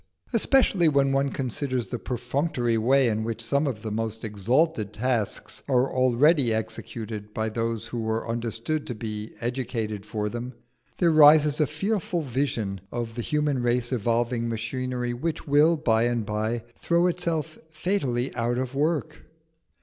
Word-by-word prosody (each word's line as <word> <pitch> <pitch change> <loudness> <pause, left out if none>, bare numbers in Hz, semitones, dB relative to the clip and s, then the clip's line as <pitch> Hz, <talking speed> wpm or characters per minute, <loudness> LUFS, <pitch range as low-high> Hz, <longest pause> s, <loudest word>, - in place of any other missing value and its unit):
Especially, 230 - +4
when 140 -2 +3
one 135 +1 +2
considers 130 -1 -2
the 120 - -3
perfunctory 120 0 -1
way 130 +4 +3
in 110 -1 0
which 115 0 -3
some 140 +6 +1
of 110 -6 -4
the 110 - -4
most 110 +1 -3
exalted 110 - +1
tasks 115 -1 -2
are 130 0 +2
already 130 +1 +4
executed 110 -1 -5
by 110 0 0
those 115 0 -2
who 115 -1 -3
are 110 +1 -1
understood 115 +6 -2
to 125 - -4
be 105 0 -6
educated 115 -4 -3
for 105 0 -3
them, 120 +3 -5 0.4
there 170 -2 +3
rises 150 -1 +6
a 150 - +3
fearful 175 - -1
vision 115 -8 -2
of 120 -1 -4
the 120 - -4
human 150 0 0
race 120 0 0
evolving 115 +1 0
machinery 125 +2 -3
which 155 +7 -3
will 150 +4 +5
by 115 -6 +2
and 120 -2 0
by 110 +2 -2
throw 170 +1 +2
itself 165 -3 -1
fatally 155 -7 -1
out 120 0 -1
of 130 0 -2
work. 155 +2 -1
120 Hz, 150 wpm, -26 LUFS, 115-145 Hz, 0.4 s, rises